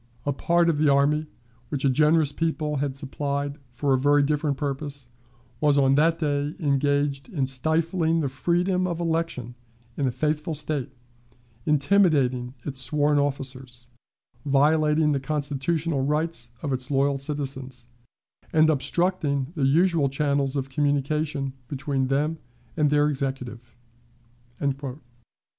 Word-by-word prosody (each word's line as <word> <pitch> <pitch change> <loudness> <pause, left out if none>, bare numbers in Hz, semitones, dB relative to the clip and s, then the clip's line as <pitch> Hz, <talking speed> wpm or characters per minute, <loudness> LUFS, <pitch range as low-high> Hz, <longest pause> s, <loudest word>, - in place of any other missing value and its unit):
A 145 - 0
part 170 +4 +2
of 160 -3 +1
the 155 -1 +4
army, 150 +3 +2 0.4
which 140 -2 -2
a - - +5
generous 150 +2 +3
people 155 -2 -1
had 135 -1 -2
supplied 140 +1 -3
for 135 +3 0
a 130 - +2
very 145 +2 +4
different 145 -1 0
purpose, 140 -2 -4 0.5
was 145 -1 +3
on 135 -1 +4
that 160 +3 +3
day 145 -1 -1
engaged 145 - 0
in 150 - -1
stifling 160 +5 0
the 145 - 0
freedom 180 +7 0
of 170 -2 -3
election 165 -7 -2 0.4
in 140 - 0
a - - 0
faithful 150 +4 -1
State, 145 -2 -3 0.8
intimidating 145 -6 +2
its 135 -2 -3
sworn 145 +3 +2
officers, 130 -3 -4 0.5
violating 150 +2 +3
the 140 - +1
constitutional 145 +2 -1
rights 150 -4 -1
of 140 -3 -1
its 130 -1 -4
loyal 140 0 +1
citizens, 135 -3 -4 0.7
and 155 0 +5
obstructing 150 -2 0
the 140 -4 +1
usual 160 0 +3
channels 140 0 0
of 135 -1 -1
communication 145 0 0
between 135 -1 -2
them 150 +4 0 0.4
and 150 -2 +2
their 145 0 +3
Executive." 130 -4 -4
145 Hz, 130 wpm, -25 LUFS, 135-155 Hz, 0.8 s, a